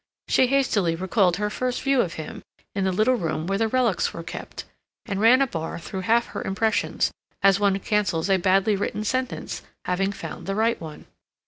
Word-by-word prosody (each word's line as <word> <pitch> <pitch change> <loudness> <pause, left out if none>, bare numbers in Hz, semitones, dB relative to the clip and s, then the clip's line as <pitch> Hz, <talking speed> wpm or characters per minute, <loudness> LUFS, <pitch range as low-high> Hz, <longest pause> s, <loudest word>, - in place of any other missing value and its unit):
She 260 - +4
hastily 225 -11 +2
recalled 185 0 +2
her 210 0 -1
first 250 +2 -2
view 275 -2 +3
of 170 - -2
him, 160 - -7 0.3
in 195 -1 -1
the 190 - +2
little 215 +7 +3
room 165 -8 -2
where 195 +2 -1
the 225 - +2
relics 240 -3 +1
were 165 - -6
kept, - - -7 0.4
and 200 -3 -3
ran 250 +5 +6
a - - +2
bar 165 -10 -4
through 190 +3 -6
half 230 +5 +3
her - - -5
impressions, 215 +3 0 0.3
as 195 0 +5
one 200 -1 +3
cancels 195 -4 0
a 195 -1 +4
badly 195 +3 +3
written 205 +2 -2
sentence, 255 +3 -2 0.2
having 195 +2 0
found 200 - -8
the 195 - -1
right 225 0 +1
one. 155 -2 -9
200 Hz, 195 wpm, -24 LUFS, 185-230 Hz, 0.4 s, ran